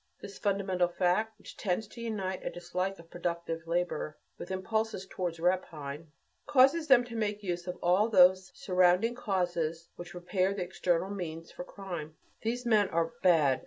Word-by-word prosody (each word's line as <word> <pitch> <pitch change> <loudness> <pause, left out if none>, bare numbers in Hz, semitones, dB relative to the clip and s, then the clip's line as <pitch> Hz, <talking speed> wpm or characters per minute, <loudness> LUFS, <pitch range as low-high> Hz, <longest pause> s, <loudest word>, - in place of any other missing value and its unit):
This 200 -1 -10
fundamental 195 -3 +1
fact, 185 +5 0
which - - -12
tends 205 +2 -1
to 235 - -10
unite 195 -5 -3
a - - -2
dislike 180 +2 -3
of 165 0 -16
productive 170 -1 -3
labor 170 -3 -1 0.2
with - - -7
impulses 215 +1 -2
towards 175 -3 -4
rapine, 165 -4 -2 0.4
causes 290 +3 +5
them 265 -3 +7
to 240 -1 -9
make 210 -2 -2
use 175 -1 -3
of 180 - -4
all 185 +6 +4
those 185 -2 +5
surrounding 185 -2 +3
causes 175 -7 -2
which 175 0 -8
prepare 185 +2 0
the 190 - -2
external 175 +1 0
means 165 -4 -5
for - - -7
crime. 175 -6 -7 0.2
These 240 +2 -2
men 210 -4 +4
are 165 0 0
"bad." 155 -7 +4
185 Hz, 165 wpm, -30 LUFS, 175-205 Hz, 0.4 s, them